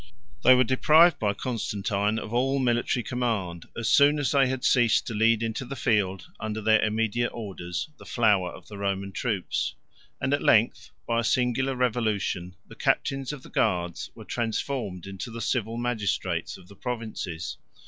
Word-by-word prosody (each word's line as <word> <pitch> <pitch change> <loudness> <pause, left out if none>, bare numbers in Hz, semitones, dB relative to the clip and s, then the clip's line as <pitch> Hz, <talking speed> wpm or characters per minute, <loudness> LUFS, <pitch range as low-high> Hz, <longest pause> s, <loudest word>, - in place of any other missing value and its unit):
They 130 - +8
were 125 - +5
deprived 155 +6 +5
by 105 -2 0
Constantine 105 -3 -1
of 110 0 -5
all 135 +3 +2
military 120 -1 +1
command, 110 -9 -2
as 115 -2 -2
soon 145 +1 +5
as 145 -3 0
they 140 -2 +4
had 130 0 -3
ceased 120 -3 +4
to 115 - -4
lead 115 +1 +3
into 115 +3 -2
the 130 +2 -6
field, 105 -7 0
under 110 0 -3
their 110 +1 +4
immediate 110 +2 0
orders, 90 - -5
the - - -12
flower 105 -6 +2
of - - -13
the 105 -2 -9
Roman 100 -1 -2
troops; 100 -2 -2 0.4
and 130 +2 0
at 145 - +1
length, 115 +1 +3 0.2
by 115 0 +1
a - - 0
singular 130 +3 +1
revolution, 110 -7 -1
the - - -12
captains 135 -1 0
of 145 -3 -8
the - - -12
guards 90 -5 0
were - - -11
transformed 115 -5 -3
into 95 +3 -6
the 115 0 -7
civil 115 0 -1
magistrates 100 -8 -2
of 90 -2 -17
the 100 - -14
provinces. 110 -8 -5
115 Hz, 170 wpm, -26 LUFS, 100-125 Hz, 0.4 s, They